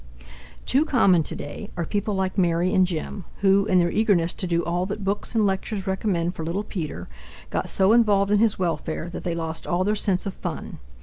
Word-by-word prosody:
Too 275 +4 +3
common 200 - +4
today 150 +6 -6
are 170 - -1
people 205 +3 -2
like 190 -1 -1
Mary 175 -1 +2
and 185 -1 +4
Jim, 180 +3 -4 0.2
who, 200 +1 +4
in 185 - +3
their 175 -1 +3
eagerness 195 -6 +2
to 185 - -2
do 170 0 0
all 175 +2 -1
that 205 0 -5
books 200 +4 -2
and 220 -2 +3
lectures 195 0 -2
recommend 190 -3 -1
for 165 - -6
little 175 +6 -2
Peter, 155 - -5 0.4
got - - -1
so 195 +2 +4
involved 205 -4 +4
in 210 - +4
his 220 -1 +3
welfare 165 -1 -2
that - - -6
they 170 -1 -2
lost 160 -1 -4
all 175 +1 +1
their 210 +2 +1
sense 195 -2 0
of 195 - -3
fun. - - -6
190 Hz, 205 wpm, -24 LUFS, 170-205 Hz, 0.4 s, common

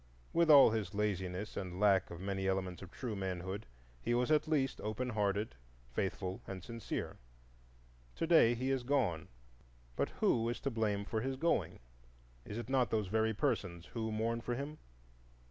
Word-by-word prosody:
With 170 -1 +3
all 140 -6 +9
his 105 -3 -2
laziness 100 -1 -2
and 90 -1 -4
lack 100 -2 +4
of 85 - -7
many 95 0 -2
elements 95 -2 -1
of 95 - -9
true 115 +1 -5
manhood, 95 +1 -4 0.3
he 120 - +1
was 125 +4 +1
at 155 0 +3
least 140 -4 +1
open 110 +4 -2
hearted, 105 -2 0 0.4
faithful, 95 +4 -2
and 95 -2 -6
sincere. 115 0 -4 1.0
To - - -1
day 160 -8 +6
he 130 +3 -1
is 135 -1 +1
gone, 120 - 0 0.7
but - - 0
who 115 0 +3
is 120 - -3
to 140 - -1
blame 105 -3 0
for 110 +1 -2
his 135 +2 -2
going? 165 +6 +1 0.7
Is 105 - -6
it 120 - -4
not 130 -3 +2
those 105 -3 0
very 110 +1 +1
persons 95 - -1
who 110 -2 -2
mourn 115 +2 -1
for 120 +1 -2
him? 145 +4 -5
110 Hz, 170 wpm, -35 LUFS, 95-125 Hz, 1.0 s, all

